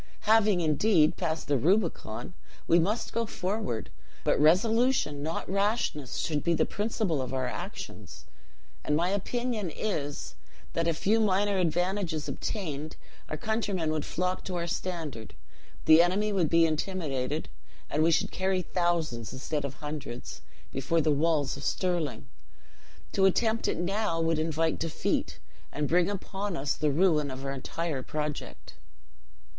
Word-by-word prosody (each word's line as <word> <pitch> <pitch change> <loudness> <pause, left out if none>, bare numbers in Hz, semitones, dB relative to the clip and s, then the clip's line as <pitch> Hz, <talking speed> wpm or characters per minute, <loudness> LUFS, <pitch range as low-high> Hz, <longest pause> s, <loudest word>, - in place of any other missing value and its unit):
"Having, 215 -4 +4
indeed, 155 +1 +4
passed 165 -3 -2
the 140 -2 +2
Rubicon, 165 - 0 0.3
we 170 - +6
must 205 +8 0
go 230 -1 0
forward, 190 - -3 0.3
but - - +2
resolution, 195 - +3
not 160 +3 -3
rashness, 195 - 0
should 150 -3 -1
be 170 -1 +2
the - - +3
principle 205 - -1
of 130 0 -3
our 130 -1 0
actions. - - -7 0.6
And 150 - +1
my 170 +3 +2
opinion 215 +1 -1
is, 150 -7 -3 0.4
that 165 0 0
a 165 - +2
few 215 +7 +2
minor 200 -1 +2
advantages 175 -2 0
obtained, 155 -7 -4 0.3
our 155 - -3
countrymen 200 -4 -1
would 155 -1 -1
flock 180 +1 -2
to 185 - -3
our 170 -1 -1
standard, 165 -9 -4 0.5
the 160 +1 +8
enemy 200 +4 +2
would 175 -6 +2
be 165 0 +5
intimidated, 155 -4 -1 0.4
and 150 - 0
we 165 - +5
should 165 - +2
carry 190 -1 0
thousands, 165 - -1
instead 145 +3 -3
of 140 -1 -4
hundreds, 145 -5 -6 0.3
before 150 +5 +1
the 155 0 +2
walls 150 -1 +2
of - - -8
Stirling. 175 -6 -1 0.8
To 195 - +3
attempt 220 +4 +2
it - - 0
now 190 0 0
would 165 -1 +1
invite 160 0 0
defeat, 165 -1 -1 0.3
and 150 0 -1
bring 175 +3 +3
upon 200 -1 -3
us 135 0 0
the 150 - 0
ruin 150 -1 +3
of 130 +1 -6
our 135 - -1
entire 140 +2 -3
project." 150 +2 -5
165 Hz, 145 wpm, -29 LUFS, 150-195 Hz, 0.8 s, the